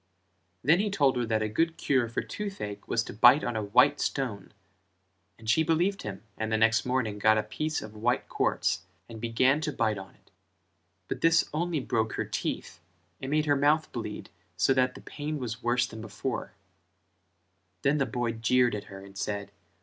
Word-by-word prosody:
Then 155 +7 +5
he 210 +1 +1
told 145 -9 +2
her 120 -1 -1
that 110 -1 +1
a - - 0
good 165 +10 0
cure 130 -4 +1
for 115 - -2
toothache 195 - -6
was 115 - +1
to - - -8
bite 120 +7 +6
on 120 - -2
a 110 - 0
white 125 +8 +4
stone 115 -8 -2 0.9
and 110 - -13
she 115 +9 +4
believed 170 +5 +1
him 100 0 -7 0.2
and 110 0 -2
the 110 - +3
next 110 +1 +3
morning 120 -5 -1
got 110 +1 +5
a 110 - +1
piece 155 +9 -3
of 110 - -9
white 120 +3 0
quartz - - 0 0.2
and 115 -2 -9
began 130 +5 +2
to 155 - -1
bite 110 -6 0
on 95 0 -11
it; - - -30 0.8
but - - -4
this 165 0 +4
only 165 0 0
broke 110 -3 -1
her - - -2
teeth 85 - -4 0.4
and 135 - -4
made 155 +1 +2
her 145 -1 +3
mouth 150 +3 +2
bleed - - -6 0.3
so 135 - +4
that 130 -1 +2
the - - -10
pain 150 +1 -5
was 120 -3 -5
worse 120 +1 +2
than 110 0 -9
before: 110 -2 -4 1.3
then 145 +2 +3
the 135 - +1
boy 120 0 -1
jeered 120 +2 +2
at 105 -1 -4
her 95 -1 -10
and 100 -1 -11
said. 100 -1 -3
120 Hz, 195 wpm, -28 LUFS, 110-145 Hz, 1.3 s, bite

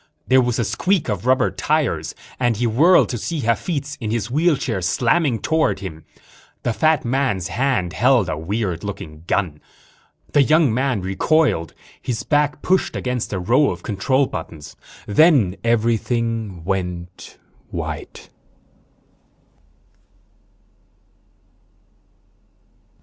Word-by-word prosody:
There 130 0 +5
was 120 -1 0
a 120 - +1
squeak 185 - 0
of 105 +2 -3
rubber 130 0 +3
tires 120 - -1 0.2
and 120 -4 +1
he 120 - 0
whirled 150 +11 +5
to 120 - -3
see 160 +6 -3
Hafitz, 140 +5 -2
in 110 - -3
his 115 0 -2
wheelchair, 150 - +1
slamming 120 - +1
toward 160 0 +1
him. 80 -5 -8 0.6
The 120 - 0
fat 155 +3 +2
man's 120 -8 0
hand 110 -5 0
held 125 -3 +3
a 90 - -2
weird 90 +2 -3
looking 90 -6 -7
gun. 85 -8 -1 0.7
The 145 - +5
young 150 -3 +3
man 125 -4 0
recoiled. 95 - +1 0.3
His 115 -4 -3
back 145 -1 0
pushed 185 0 +1
against 125 -2 -3
a 100 - -2
row 120 +11 +3
of - - -6
control 130 +6 +1
buttons. 80 - -8 0.3
_Then 115 - +4
everything 115 -4 0
went 90 -1 -4 0.3
white. - - -6
115 Hz, 115 wpm, -21 LUFS, 95-140 Hz, 0.7 s, There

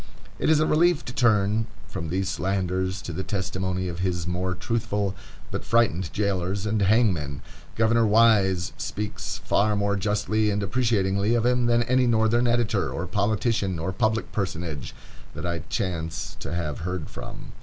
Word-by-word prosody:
It - - +1
is 155 -1 +5
a 155 - +3
relief 170 +1 +3
to 125 - -6
turn 110 -3 +2 0.2
from 80 -5 -5
these 95 +3 -1
slanders 95 0 -1
to - - -5
the 95 - -3
testimony 95 -1 -2
of 85 -1 -5
his 90 -2 -1
more 90 +1 -2
truthful, 105 0 -1 0.4
but - - -3
frightened, 100 -7 +1
jailers 100 -1 -1
and 105 0 0
hangmen. 95 - +2 0.3
Governor 115 0 +3
Wise 105 -5 +4
speaks 105 0 -4
far 105 +1 +1
more 100 0 +1
justly 105 +2 +1
and 105 0 0
appreciatingly 100 -1 +1
of 120 -1 +1
him 125 -1 +2
than 120 0 +3
any 125 +1 +2
Northern 115 +1 +3
editor, 110 - +1
or 80 +8 -3
politician, 100 -1 0
or 85 +4 -3
public 110 +1 0
personage, 85 -7 -4 0.4
that - - -5
I 85 -1 -1
chance 80 -6 -3
to - - -6
have 85 -5 -2
heard 90 -2 -3
from. - - -9
100 Hz, 160 wpm, -25 LUFS, 90-110 Hz, 0.4 s, is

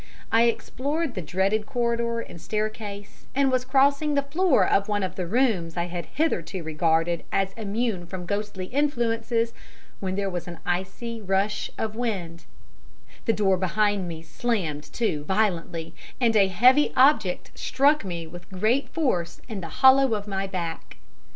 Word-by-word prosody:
I 230 +1 +5
explored 280 +5 -1
the 185 - -4
dreaded 190 +7 0
corridor 235 -2 0
and 170 - -10
staircase, 210 -1 -5
and 275 -1 +3
was 255 -1 +1
crossing 280 +3 +3
the 280 - +2
floor 315 +2 +3
of 200 0 +2
one 205 -1 0
of 185 -2 -2
the 180 -2 -3
rooms 190 -7 +1
I 170 - +1
had 175 -1 -5
hitherto 190 - -1
regarded 165 +1 +1
as 195 0 0
immune 215 -3 -2
from 180 0 -6
ghostly 200 -1 -3
influences, 230 -3 0 0.5
when 190 -1 -2
there 200 0 -1
was 180 -2 -4
an 170 -1 -7
icy 190 +6 -3
rush 200 +1 0
of 220 -1 -3
wind, 190 -8 -3 0.8
the 225 - +3
door 195 -3 +2
behind 200 +1 +1
me 165 -1 -7
slammed 165 -6 -2
to 165 -11 -1
violently, 175 -4 -1 0.3
and 235 -3 +3
a 200 -2 +6
heavy 250 +10 +5
object 255 -9 +3
struck 285 +2 +2
me 170 -3 -4
with 175 +2 -11
great 215 +8 +1
force 185 - -1
in 215 -5 -5
the 165 - -6 0.2
hollow 265 -3 +7
of 205 0 -5
my 195 -1 -2
back. 175 -4 -5
205 Hz, 155 wpm, -25 LUFS, 180-240 Hz, 0.8 s, hollow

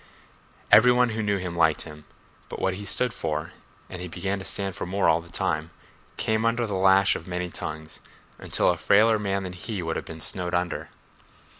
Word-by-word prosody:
Every 125 - +8
one 125 0 +3
who 110 0 -2
knew 105 -1 +1
him 90 -2 -5
liked 80 -2 +3
him—but 75 -1 -13
what 95 - 0
he 100 +2 -7
stood 125 +3 +1
for 75 -1 -3 0.4
(and 90 - -8
he 90 - -5
began 95 +3 -3
to - - -7
stand 95 0 -3
for - - -5
more 95 +2 +1
all 80 0 +4
the 85 - -15
time) 80 +1 -1 0.5
came 110 0 0
under 115 +1 +1
the 105 - -4
lash 95 +1 +4
of 85 - -7
many 90 0 -3
tongues, 80 -1 -7 0.4
until - - +2
a - - -3
frailer 110 +2 +4
man 100 -1 -1
than 90 -1 -6
he 95 +1 -5
would 80 -1 -2
have - - -5
been 80 - -9
snowed 90 +2 -1
under. 90 0 -2
95 Hz, 200 wpm, -26 LUFS, 85-105 Hz, 0.5 s, Every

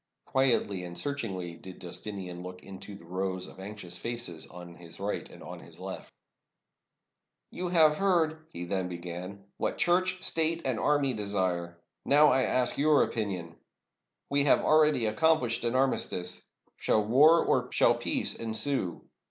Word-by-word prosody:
Quietly 115 -8 +1
and 85 0 -7
searchingly 100 -12 -3
did 95 +2 -11
Justinian 90 -1 -6
look 90 0 -9
into 100 +1 -10
the 85 - -14
rows 95 +1 -2
of - - -13
anxious 95 -3 -7
faces 115 -9 -4
on 90 +1 -11
his 85 0 -11
right 100 +1 -3
and - - -13
on - - -8
his - - -13
left, - - -8 1.4
"You 180 - -4
have 160 -4 +4
heard," 160 -5 +1
he 85 +1 -6
then 95 0 -2
began, 90 +3 -7
"what - - -2
Church, 185 +1 +1
State, 165 +1 +1
and 130 -4 -1
Army 145 -3 +2
desire. 95 -5 -2
I 85 - -17
now 145 0 +6
ask 130 -1 +1
your 150 0 +4
opinion. 90 -7 -4 0.7
We 140 0 +2
have - - +5
already 155 -6 +4
accomplished 120 0 +1
an 120 +1 0
armistice. 110 -9 0 0.4
Shall 110 -1 +1
war 150 +9 +5
or - - +1
shall - - +4
peace - - 0
ensue? 115 -3 0
110 Hz, 150 wpm, -29 LUFS, 90-145 Hz, 1.4 s, now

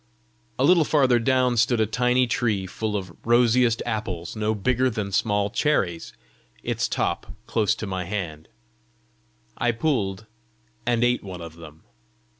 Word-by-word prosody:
A 130 - +1
little 170 +2 +5
farther 135 -5 +3
down 125 0 +2
stood 115 +1 +3
a 110 - +3
tiny 125 +3 +2
tree 110 -5 0
full 105 +3 -3
of 95 -3 -7
rosiest 120 0 +3
apples 100 -7 -4
no 110 0 0
bigger 130 +5 +1
than 105 -4 -4
small 105 +1 +1
cherries, 95 - 0 0.5
its - - -1
top - - -2
close 110 -1 +1
to 110 - -5
my 95 -2 -3
hand; 85 -6 -5 1.1
I 120 - +2
pulled 115 -6 -1 0.6
and 120 -1 +2
ate 120 0 +2
one 95 -3 -7
of 85 -1 -9
them. 80 -1 -13
110 Hz, 145 wpm, -24 LUFS, 95-125 Hz, 1.1 s, little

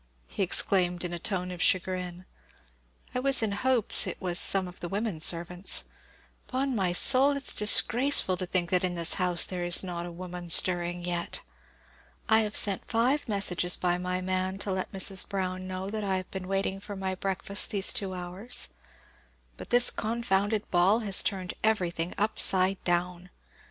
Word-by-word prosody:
exclaimed 180 -1 +1
he - - -4
in 175 - -6
a 175 - -6
tone 180 0 -2
of 175 -2 -8
chagrin. 180 0 -2 0.9
"I 250 - -2
was 270 -2 +2
in 215 - -1
hopes 245 +2 +2
it - - -6
was 175 -2 -1
some 190 -2 +4
of 180 - -12
the 175 - -7
women 200 -3 -4
servants. 175 +3 0 0.6
'Pon 260 0 -2
my 190 -4 -1
soul, 275 +9 +4
it's 280 - +2
disgraceful 225 0 +3
to 185 0 -6
think 175 -1 -2
that 180 -1 +1
in 180 -1 -2
this 170 -1 +4
house 180 -2 +2
there 180 -2 -5
is 175 +1 +4
not 175 -2 -6
a - - -9
woman 175 0 -9
stirring 175 0 +3
yet! 175 - -5 0.9
I 220 -1 +4
have 215 -1 -3
sent 200 -2 -1
five 245 +4 0
messages 185 -3 +1
by 175 0 -1
my 180 0 -3
man 185 +1 -3
to 200 - -4
let 185 0 -4
Mrs. 190 0 +2
Brown 185 -2 -4
know 185 0 -6
that 215 -1 -4
I 190 -2 -1
have 185 -1 -8
been 190 -1 -7
waiting 195 0 -3
for 205 +1 -9
my 190 -1 -4
breakfast 195 +1 0
these 200 -3 +4
two 190 -2 -5
hours; 180 +7 +1 0.9
but - - -12
this 245 0 +4
confounded 215 -2 -2
ball 190 +6 +2
has 200 -3 +3
turned 185 -3 -4
everything 180 -6 -1
upside 195 -2 +1
down! 175 0 -3
185 Hz, 175 wpm, -27 LUFS, 180-205 Hz, 0.9 s, some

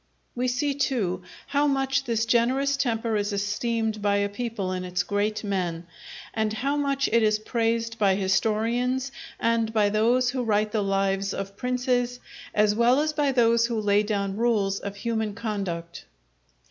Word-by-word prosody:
We 250 +1 -1
see, 255 +3 0
too, 230 -10 -1 0.2
how 285 +1 +1
much 270 0 +1
this 230 -2 0
generous 255 +4 +2
temper 230 -4 -1
is 205 0 0
esteemed 215 +2 -1
by 205 0 +2
a 200 0 +1
people 205 -3 -3
in 185 0 -3
its 180 0 -1
great 210 +2 -1
men; 180 -4 -2 0.5
and 220 -1 0
how 275 +6 -1
much 280 -1 0
it 230 +1 +4
is 215 -1 +3
praised 230 +1 -1
by 195 -2 +4
historians 230 +7 0 0.3
and 230 -1 +1
by 210 -2 +3
those 240 +4 +2
who 260 0 -2
write 215 -1 +1
the 215 - 0
lives 195 0 0
of 195 0 -5
princes, 250 +1 -1 0.4
as 210 0 +4
well 235 +4 +4
as 305 +1 0
by 290 -2 +1
those 235 -2 +3
who 230 -2 -2
lay 205 -1 +3
down 200 -2 -2
rules 210 -4 +1
of 200 0 -6
human 220 -1 -2
conduct. 195 -7 -4
225 Hz, 165 wpm, -26 LUFS, 200-245 Hz, 0.5 s, it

